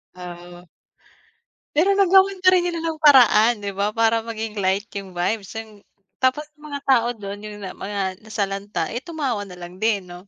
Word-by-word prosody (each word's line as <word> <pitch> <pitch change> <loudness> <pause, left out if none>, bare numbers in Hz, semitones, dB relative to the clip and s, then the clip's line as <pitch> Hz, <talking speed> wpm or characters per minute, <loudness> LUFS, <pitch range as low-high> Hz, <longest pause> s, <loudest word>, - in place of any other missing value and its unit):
Oo. 175 0 -10 1.1
Pero 330 +6 +3
nagawan 385 0 +4
pa 370 - +8
rin 365 -1 +4
nila 340 -1 -3
ng 320 -1 -3
paraan, 240 -5 +7
'di 200 - -2
ba, 200 - +2
para 225 0 +3
maging 220 -2 -5
light 195 +2 0
'yong 195 -2 -8
vibes, 195 +4 -2
'yong 220 0 -6 0.5
tapos 260 +3 +2
'yong 300 0 -23
mga 285 -1 -5
tao 245 -4 +3
do'n 200 -1 -7
'yong 210 -1 -8
na 190 - -5
mga 200 0 -6 0.2
nasalanta, 205 -2 -3
eh, 240 - -3
tumawa 265 - -3
nalang 180 0 -11
din, 215 -2 +1
'no? 180 +1 -12
220 Hz, 175 wpm, -22 LUFS, 195-275 Hz, 1.1 s, pa